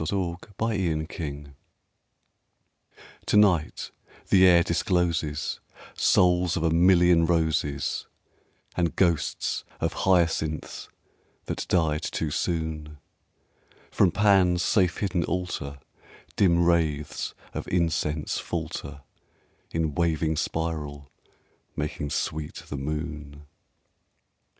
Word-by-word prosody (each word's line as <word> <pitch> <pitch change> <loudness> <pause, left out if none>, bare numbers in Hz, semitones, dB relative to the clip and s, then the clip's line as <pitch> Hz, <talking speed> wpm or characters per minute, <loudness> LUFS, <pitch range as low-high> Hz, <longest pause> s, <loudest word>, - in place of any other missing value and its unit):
In 80 - -2
an 100 - 0
Autumn 90 -2 -2
Garden 75 -4 -7 1.7
TO - - +3
NIGHT 90 -7 +2 0.4
the 95 -1 +6
air 85 -1 +6
discloses 85 -5 0 0.3
Souls 90 -1 +3
of 85 - -1
a 85 - +2
million 85 -1 +5
roses, 80 -4 0 0.7
And 85 -2 0
ghosts 85 -5 0 0.2
of - - -1
hyacinths 80 -4 0 0.6
that - - -4
died 80 -3 +2
too 80 -2 -3
soon; 80 -2 -3 0.9
From 95 - +4
Pan's 95 -3 +3
safe 90 -5 +2
hidden 95 -4 0
altar 90 -6 -3 0.6
Dim 85 -3 +3
wraiths 80 -4 0 0.2
of - - -5
incense 80 -3 0
falter 70 0 -5 0.7
In 80 -2 -1
waving 80 -1 0
spiral, 75 -3 -3 0.6
making 75 0 -3
sweet 75 +1 -3
the - - -7
moon! 75 0 -5
80 Hz, 95 wpm, -26 LUFS, 75-90 Hz, 1.7 s, the